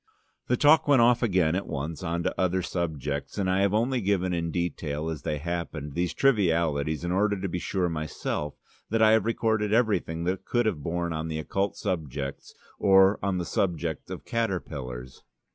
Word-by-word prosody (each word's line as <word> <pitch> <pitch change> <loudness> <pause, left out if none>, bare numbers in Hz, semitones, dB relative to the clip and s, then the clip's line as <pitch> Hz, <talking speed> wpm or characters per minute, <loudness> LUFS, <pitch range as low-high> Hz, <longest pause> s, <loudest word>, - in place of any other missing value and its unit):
The - - +2
talk 150 +2 +5
went 135 -5 +6
off 120 0 +4
again 90 -8 +2
at 95 - -2
once 75 +3 -4
on 85 +1 -2
to - - 0
other 95 0 +1
subjects, 75 -5 -3
and 100 -2 0
I 95 +1 +2
have 100 -1 +3
only 120 +4 +1
given 95 -2 +1
in 85 -1 -1
detail, 80 -2 -2
as 80 -4 -5
they 75 - -2
happened, 80 -2 -4
these 85 +2 -1
trivialities 85 - +2
in 85 - -1
order 100 +2 +1
to 95 - -2
be 90 0 -3
sure 90 0 -1
myself 75 -2 -3 0.3
that 110 +1 +2
I 110 - +6
have 110 -2 +4
recorded 110 -2 0
everything 105 -8 +1
that 90 +2 -1
could 120 -1 0
have 95 -9 0
borne 85 +2 -2
on 80 +1 -3
occult 80 +6 -2
subjects 70 -5 -4 0.2
or 95 +1 +5
on 95 -1 0
the 90 - -2
subject 85 -5 -2
of - - -7
caterpillars. 70 - -4
90 Hz, 180 wpm, -27 LUFS, 80-100 Hz, 0.3 s, went